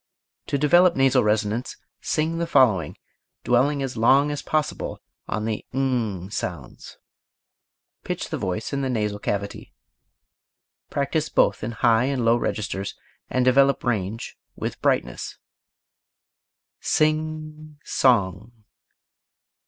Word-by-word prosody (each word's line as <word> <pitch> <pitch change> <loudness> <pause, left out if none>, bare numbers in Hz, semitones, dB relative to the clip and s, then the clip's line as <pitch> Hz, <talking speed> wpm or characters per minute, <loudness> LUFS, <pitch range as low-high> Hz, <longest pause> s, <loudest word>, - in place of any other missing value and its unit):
To 140 - 0
develop 175 +5 +5
nasal 135 -1 +4
resonance 105 +3 0 0.2
sing 160 +2 -1
the 170 - -1
following, 110 - +3 0.5
dwelling 135 +4 +2
as 130 -2 -4
long 135 +6 +4
as 145 0 -3
possible 155 -1 -2 0.3
on 105 +2 -2
the 110 -1 -2
ng 115 -8 -1
sounds. 85 - -6 1.1
Pitch - - -4
the - - -1
voice 95 +8 -3
in 140 - -1
the 135 - -1
nasal 105 -4 -1
cavity. 100 0 -4 1.1
Practise - - -1
both - - +2
in 115 +2 -3
high 115 +1 +3
and 135 -3 -1
low 115 +1 +5
registers, 100 -4 -3 0.3
and 130 -1 +1
develop 135 +2 +4
range 110 -2 -2 0.2
with - - -5
brightness. - - -1 1.4
Sing 155 0 -1
song. 110 -1 +1
125 Hz, 115 wpm, -24 LUFS, 105-140 Hz, 1.4 s, develop